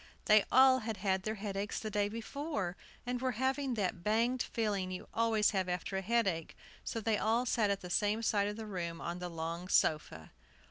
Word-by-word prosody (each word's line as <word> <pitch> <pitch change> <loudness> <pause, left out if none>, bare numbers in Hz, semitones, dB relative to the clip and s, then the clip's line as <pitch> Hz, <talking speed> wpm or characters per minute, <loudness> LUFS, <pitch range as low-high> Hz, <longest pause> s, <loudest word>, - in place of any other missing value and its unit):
They 215 -1 +6
all 260 0 +7
had 225 -2 -4
had 190 -1 0
their 215 +3 -3
headaches 200 0 -3
the 215 - -5
day 205 0 +1
before, 230 - -4 0.3
and 245 0 -2
were 260 -1 0
having 265 +1 0
that 185 -5 -2
banged 235 +5 +2
feeling 205 -5 -1
you 185 0 -6
always 225 -2 +3
have 190 -3 -1
after 180 +2 -3
a 190 - 0
headache; 195 -6 0 0.3
so 230 - -3
they 220 -1 +1
all 230 +3 +2
sat 225 -3 +2
at 200 -1 0
the 180 - -7
same 210 +4 +1
side 205 -2 +2
of 210 - -3
the 220 0 -6
room 170 -5 -4
on 175 +1 -4
the 180 0 -4
long 165 +2 -4
sofa. 150 - +1
210 Hz, 200 wpm, -33 LUFS, 185-230 Hz, 0.3 s, all